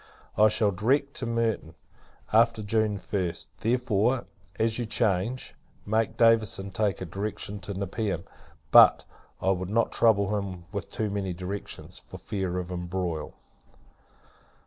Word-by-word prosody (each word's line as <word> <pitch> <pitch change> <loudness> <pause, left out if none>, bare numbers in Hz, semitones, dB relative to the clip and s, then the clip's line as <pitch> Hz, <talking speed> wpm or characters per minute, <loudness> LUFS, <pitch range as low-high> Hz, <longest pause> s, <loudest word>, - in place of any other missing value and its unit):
I 105 +1 +6
shall 105 -1 +2
direct 135 +9 +1
to 125 - -3
Merton, 115 -8 -1 0.6
after 115 -1 +4
June 110 0 +1
1st. 90 -3 -3
Therefore, 120 +1 +1 0.3
as 110 +1 +1
you 120 - -2
change, 110 +3 0 0.3
make 110 +1 0
Davison 110 -4 +3
take 100 -1 0
a - - -3
direction 100 +3 -4
to 100 +1 -6
Nepean; 100 -2 -2 0.5
but, - - +8 0.3
I 95 - +2
would 95 -1 -2
not 115 +3 +1
trouble 105 -3 +3
him 95 -3 -6
with 100 -4 -5
too 110 -2 -2
many 100 -2 -2
directions, 95 +3 -6
for - - -11
fear 95 -4 -3
of 90 0 -4
embroil. 90 -3 -3
100 Hz, 135 wpm, -27 LUFS, 95-115 Hz, 0.6 s, but